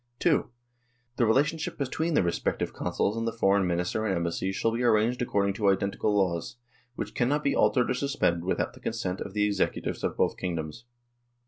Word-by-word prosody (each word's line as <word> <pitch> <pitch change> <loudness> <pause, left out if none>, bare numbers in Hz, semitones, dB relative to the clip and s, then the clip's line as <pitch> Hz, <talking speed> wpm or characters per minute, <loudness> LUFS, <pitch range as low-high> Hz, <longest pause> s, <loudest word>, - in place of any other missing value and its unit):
" 120 - -46
(2) - - +2 0.7
The 120 - +3
relationship 150 +7 +1
between 160 +4 -1
the - - +4
respective 85 - -1
Consuls 105 - -1
and 115 0 -2
the - - 0
Foreign 100 -4 +2
Minister 90 +5 -1
and 100 -3 0
Embassies 85 +3 -2
shall 115 - +1
be 115 +2 -2
arranged 120 +1 +2
according 100 -4 +1
to 100 0 +2
identical 100 +1 +1
laws, 90 -4 0 0.4
which - - -5
cannot 145 +4 +1
be 140 - +1
altered 125 -1 +3
or - - +3
suspended 125 -11 0
without 95 - -1
the - - -14
consent 95 -5 -3
of 100 - -6
the 105 0 +3
Executives 105 -1 -1
of - - -1
both - - +1
kingdoms." 85 +4 -4
105 Hz, 190 wpm, -28 LUFS, 95-125 Hz, 0.7 s, the